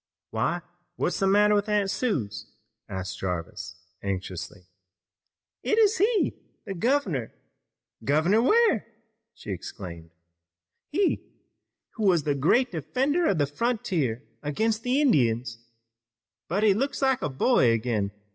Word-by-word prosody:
"Why, 175 - 0 0.3
what's 175 - -1
the 195 - +2
matter, 205 +1 +5
Aunt 205 -2 +2
Suse?" 200 - -2 0.4
asked 95 -1 -5
Jarvis 90 0 -4 0.3
anxiously. 95 -1 -5 1.0
"It 435 - +1
is 440 0 +4
he! 425 +1 +2 0.3
The 200 - -4
governor! 190 - 0 0.7
Governor 165 +10 +3
Ware!" 430 - +3 0.5
she - - -8
exclaimed. 85 -2 -7 0.8
"He, 385 +5 0 0.6
who 220 - -2
was 175 -5 +4
the 145 - +1
great 170 - +2
defender 265 - 0
of 190 - +2
the 145 - +3
frontier 145 - -1 0.2
against 215 +10 0
the 250 +4 +1
Indians! 120 - +2 0.9
But 195 +6 0
he 210 -2 +6
looks 275 +6 -1
like 265 -2 +2
a - - -1
boy 135 - +3
again! 110 -3 0
175 Hz, 120 wpm, -26 LUFS, -, 1.0 s, he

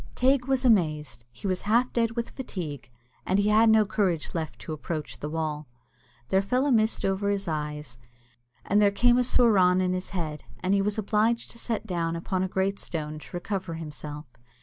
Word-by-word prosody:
Teig 260 0 +2
was 265 -1 +1
amazed; 155 - +1
he 200 - -12
was 185 -2 0
half 235 +5 +2
dead 230 -1 +1
with 235 -1 -3
fatigue, 155 - -6 0.3
and 190 - +1
he 205 +1 +2
had 220 +2 +5
no 220 -1 +5
courage 195 -6 -1
left 160 -3 -4
to 155 - -5
approach 155 0 -5
the 150 - -4
wall. 155 -2 -3 0.6
There 190 - +3
fell 250 +7 +1
a 290 - +2
mist 220 -2 +2
over 195 +1 0
his 200 -1 -1
eyes, 150 -5 -4 0.7
and 205 +1 +3
there 205 - +6
came 240 +4 +3
a - - +3
soorawn 195 -7 +4
in 185 0 +1
his 185 0 -4
head, 155 -6 -4 0.2
and 185 +2 +1
he 200 - +3
was 205 +1 -1
obliged 215 +2 +1
to 230 - -8
sit 225 -2 -2
down 170 -4 -1
upon 185 +2 -2
a 190 - +1
great 190 +1 -1
stone 155 -2 -4
to - - -13
recover 185 -2 -4
himself. 150 -1 -7
190 Hz, 195 wpm, -27 LUFS, 160-220 Hz, 0.7 s, there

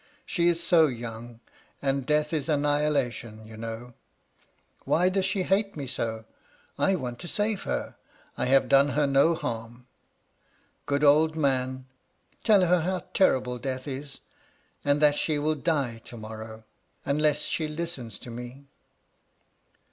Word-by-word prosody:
She 170 -2 +1
is 170 -1 +2
so 165 -2 +5
young; 120 -2 -7 0.4
and 135 -1 -1
death 150 +1 +1
is 150 -2 -1
annihilation, 145 -7 0
you 110 0 -11
know. 115 +2 -7 0.9
Why 180 +3 +3
does 190 0 0
she 195 -1 0
hate 195 0 0
me 140 - -4
so? 110 -3 -4 0.5
I 195 - +2
want 125 -7 -5
to 175 - -7
save 210 +2 -1
her; - - -3 0.4
I - - -1
have 135 +1 +4
done 140 +1 +5
her 150 - +4
no 140 +4 +4
harm. 120 -5 -5 1.0
Good 145 +1 0
old 155 +2 +5
man, 130 -3 0 0.6
tell 210 -4 +5
her 180 0 +3
how 180 +1 -2
terrible 125 -9 +2
death 130 +1 -4
is; 140 0 -6 0.6
and 145 +1 +2
that 145 -1 +5
she 155 -2 0
will 150 +2 +1
die 140 -6 -1
to 120 - -10
morrow, 110 0 -8 0.4
unless 150 +1 +2
she 155 - -1
listens 150 -9 -5
to 120 - -9
me.' 125 +4 -8
140 Hz, 145 wpm, -27 LUFS, 120-160 Hz, 1.0 s, so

